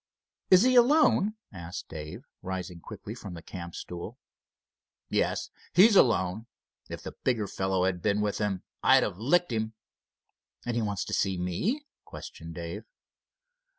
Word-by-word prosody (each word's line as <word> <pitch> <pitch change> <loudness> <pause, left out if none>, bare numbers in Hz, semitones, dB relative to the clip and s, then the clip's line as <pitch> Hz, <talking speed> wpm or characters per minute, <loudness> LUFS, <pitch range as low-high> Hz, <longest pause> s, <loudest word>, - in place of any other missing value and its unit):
"Is 185 +2 +8
he 255 0 +4
alone?" 245 -5 +5 0.2
asked 85 -1 -7
Dave, 75 -1 -7 0.2
rising 90 -1 -5
quickly - - -8
from 95 -3 -8
the 85 - -9
camp 85 -2 -8
stool. 85 -1 -7 0.9
"Yes, - - 0 0.2
he's 200 +5 +8
alone. 110 - +3 0.4
If - - -7
the - - -5
bigger 115 -5 +1
fellow 95 -1 0
had 90 -2 0
been 100 +2 +1
with 105 -1 0
him 100 -3 -1 0.2
I'd - - +6
have 85 - -3
licked 170 +7 +2
him." 110 -1 -1 0.9
"And 120 -1 -1
he 120 - +1
wants 100 -2 -2
to - - -5
see 95 -1 +1
me?" 175 - -1 0.2
questioned 80 0 -9
Dave. 85 +5 -5
100 Hz, 150 wpm, -29 LUFS, 90-125 Hz, 0.9 s, Is